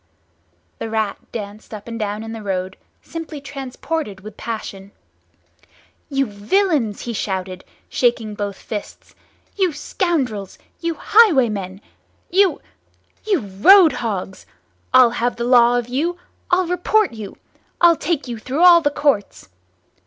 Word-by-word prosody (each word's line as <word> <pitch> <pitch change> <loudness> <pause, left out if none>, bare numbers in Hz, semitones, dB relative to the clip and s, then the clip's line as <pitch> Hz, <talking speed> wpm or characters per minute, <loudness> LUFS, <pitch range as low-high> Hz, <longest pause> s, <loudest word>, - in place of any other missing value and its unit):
The 225 - -4
Rat 220 -2 -1
danced 210 0 -7
up 210 +1 -11
and 230 0 -6
down 210 0 -3
in 225 - -7
the 225 - -7
road, 190 -2 -3 0.3
simply 325 -2 -7
transported 275 -4 -5
with 210 +1 -10
passion. 205 -4 -6 1.2
"You 275 -1 +1
villains!" 230 - 0
he 235 - -4
shouted, 185 -3 -4 0.2
shaking 235 -3 0
both 205 -1 -4
fists, 210 +1 -8 0.4
"You 375 -5 +1
scoundrels, 275 - -2 0.2
you 335 -1 -2
highwaymen, 235 - +3 0.5
you—you—roadhogs!—I'll 255 - +1
have 245 0 -1
the 235 - -4
law 245 0 +5
of 240 -1 -2
you! 310 +8 -1 0.3
I'll 365 +1 +3
report 360 - +1
you! 215 -3 -8 0.4
I'll 345 -1 +6
take 310 -3 -2
you 235 -2 -5
through 270 +9 -1
all 345 -1 +8
the 290 - +2
Courts!" 285 - -1
240 Hz, 120 wpm, -20 LUFS, 205-320 Hz, 1.2 s, all